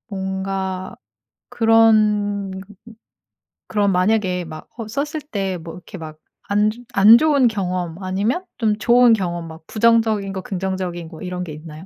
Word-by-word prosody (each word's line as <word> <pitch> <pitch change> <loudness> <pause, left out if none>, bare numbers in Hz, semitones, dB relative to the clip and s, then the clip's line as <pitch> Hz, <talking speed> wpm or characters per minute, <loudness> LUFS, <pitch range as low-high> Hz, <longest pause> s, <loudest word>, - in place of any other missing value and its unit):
뭔가 190 -1 -3 0.5
그런 215 -3 +3 1.2
그럼 205 -2 +1
만약에 185 -1 +1
막 155 -1 -10
허 225 -3 -6
썼을 290 +7 -3
때 195 -3 -2
이렇게 175 +3 -10
막 155 -2 -9 0.3
안 210 +1 +3
즈 235 +3 -8
안 210 +4 +8
좋은 285 -2 +3
경험 185 -4 -3
아니면 205 - -1
좀 215 -3 +1
좋은 240 +2 +5
경험 175 -5 -2
막 160 0 -12
부정적인 220 -3 +2
것 190 -1 -5
긍정적인 185 -3 -4
것 160 -2 -12
이런 180 0 -4
게 160 -4 -7
있나요? 155 +2 -10
195 Hz, 255 characters per minute, -20 LUFS, 180-220 Hz, 1.2 s, 안